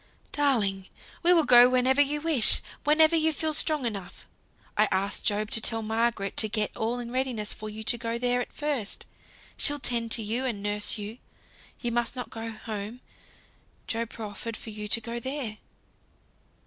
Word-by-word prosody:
"Darling! 210 -10 +1 0.3
we 350 - +4
will 335 -3 +5
go 245 -2 +8
whenever 255 +2 +3
you 290 +1 +1
wish; 310 -8 +4 0.3
whenever 315 +2 +5
you 320 0 +3
feel 315 0 -1
strong 300 -3 +2
enough. 195 -5 -5 0.5
I 215 +1 +4
asked 195 +1 -1
Job 210 +1 0
to 225 - +4
tell 225 0 +3
Margaret 220 -2 0
to 215 - +2
get 210 -1 -1
all 230 +2 -1
in 240 -1 -6
readiness 250 -5 -1
for 215 - -7
you 215 +1 -7
to 240 +2 0
go 230 0 -2
there 245 +1 +1
at - - -6
first. 285 -9 -3 0.5
She'll 290 0 +1
tend 235 -4 0
you 225 +3 -2
and 225 -6 -3
nurse 205 +1 +2
you. 215 +3 -7 0.6
You 240 - -1
must 240 +1 -1
not 250 - -5
go 225 0 -5
home. 220 +1 -6 0.8
Job 230 0 -2
proffered 220 0 -6
for 220 - -8
you 210 0 -6
to 225 - +3
go 235 +1 -5
there." 255 -4 -5
230 Hz, 175 wpm, -27 LUFS, 215-260 Hz, 0.8 s, go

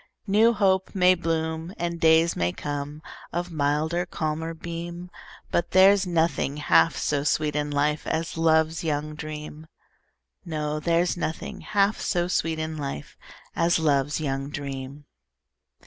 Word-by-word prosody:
New 215 +3 +4
hope 190 -2 +1
may 185 -1 +6
bloom, 165 0 -2
And 170 0 -3
days 160 +1 +4
may 85 0 0
come, 145 +1 -5 0.3
Of 175 +1 -3
milder, 155 +4 0
calmer 160 0 -3
beam, 170 +2 -7 0.4
But 170 - 0
there's 190 +1 +6
nothing 165 -4 0
half 85 - +3
so 145 -1 0
sweet 150 0 0
in 150 0 -1
life 145 +1 0
As 165 +1 -2
love's 160 0 +2
young 150 -1 -2
dream; 150 0 -8 0.8
No, 155 -2 -3
there's 170 +2 +1
nothing 165 -2 -4
half 205 0 +1
so 175 -2 0
sweet 165 -3 0
in 160 0 -4
life 140 - -6 0.4
As 170 +1 +3
love's 145 -2 +1
young 135 -2 -2
dream. 140 0 -6
160 Hz, 135 wpm, -25 LUFS, 150-170 Hz, 0.8 s, may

